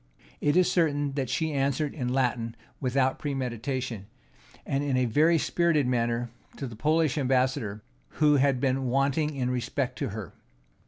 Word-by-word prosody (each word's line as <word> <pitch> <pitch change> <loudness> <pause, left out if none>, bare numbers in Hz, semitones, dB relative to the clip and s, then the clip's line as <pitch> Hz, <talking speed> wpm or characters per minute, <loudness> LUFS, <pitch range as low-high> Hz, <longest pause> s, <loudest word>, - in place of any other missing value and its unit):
It 145 +3 +2
is 185 - +5
certain 145 -4 +1
that 135 -3 -2
she 160 +4 -1
answered 140 +1 0
in 125 -5 -3
Latin 120 -3 0 0.2
without 130 0 +1
premeditation, 125 -5 -3 0.6
and 140 +1 -1
in 140 -3 0
a 130 - +2
very 155 +8 +4
spirited 165 -2 +2
manner, 120 -1 0 0.3
to 140 - -4
the 120 -3 -7
Polish 155 +4 +1
ambassador, 125 -6 0 0.3
who 150 -1 +4
had 135 -1 +2
been 135 0 0
wanting 140 +4 +1
in 125 -2 -1
respect 125 +1 -2
to - - -1
her. 105 -4 -7
135 Hz, 155 wpm, -27 LUFS, 125-145 Hz, 0.6 s, is